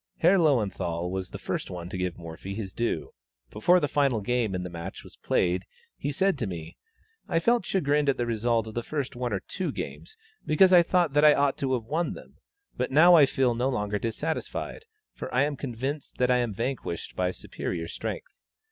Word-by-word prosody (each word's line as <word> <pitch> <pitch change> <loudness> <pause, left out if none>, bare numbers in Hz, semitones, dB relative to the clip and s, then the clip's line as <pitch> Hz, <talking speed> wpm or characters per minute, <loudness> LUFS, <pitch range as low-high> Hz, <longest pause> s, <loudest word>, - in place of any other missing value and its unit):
Herr 185 +4 +5
Löwenthal 95 - +1
was 95 -1 -3
the - - -7
first - - -3
to 90 -1 -6
give 90 -1 -2
Morphy 85 +3 -7
his 100 -4 -5
due; 120 0 -2 0.4
before 175 +12 +4
the 145 - 0
final 140 -5 +2
game 110 -1 0
in 90 - -2
the 90 - -5
match 85 +2 -7
was - - -14
played, 90 +1 +1 0.3
he 145 - -3
said 190 +2 +1
to 115 - -1
me: 85 -3 -7 0.5
"I 165 - +1
felt 235 +8 +2
chagrined 150 -5 +2
at 135 - +2
the 120 - 0
result 115 0 +1
of 110 - -8
the 120 - -2
first 140 0 -4
one 125 0 -2
or 95 -2 -1
two 185 - -3
games, 440 - -7 0.3
because 185 +5 +5
I 175 - +9
thought 170 -3 +2
that 145 +1 +4
I 150 -1 +8
ought 140 -1 +2
to 135 -1 0
have 120 - -3
won 155 +9 -1
them; - - -13 0.4
but 125 - -1
now 160 +6 +7
I 150 -5 +8
feel 130 -2 +2
no 125 +3 0
longer 105 -5 -1
dissatisfied, 155 - -3 0.3
for - - -7
I 125 +2 +3
am 145 0 -1
convinced 135 +3 -5
that 125 0 +2
I 125 - +4
am 120 -2 0
vanquished 115 -4 -4
by 90 0 +1
superior 85 -2 -5
strength." - - -5
125 Hz, 205 wpm, -27 LUFS, 100-150 Hz, 0.5 s, I